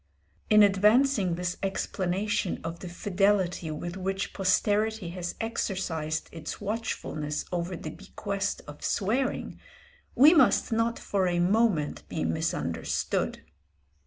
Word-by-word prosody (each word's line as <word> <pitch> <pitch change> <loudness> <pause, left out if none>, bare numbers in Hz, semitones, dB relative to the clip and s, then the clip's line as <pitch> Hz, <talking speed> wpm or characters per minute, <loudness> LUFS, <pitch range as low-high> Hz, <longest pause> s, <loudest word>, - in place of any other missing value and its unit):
In 215 -1 +7
advancing 205 0 +4
this 180 +1 -3
explanation 195 0 -1
of 165 +1 -5
the 180 - -7
fidelity 190 -2 +1
with 170 +3 -5
which 195 +1 -2
posterity 205 +1 +1
has 175 0 -5
exercised 185 -8 -2
its 165 -2 -6
watchfulness 155 -8 -3
over 175 +1 -2
the 155 -2 -6
bequest 200 +2 -4
of 150 0 -10
swearing, 245 +7 -1 0.6
we 295 +6 +8
must 270 -7 +4
not 230 +1 +1
for 195 -2 0
a 175 -1 0
moment 180 -4 +1
be - - -2
misunderstood. 80 0 -1
190 Hz, 115 wpm, -28 LUFS, 175-215 Hz, 0.6 s, we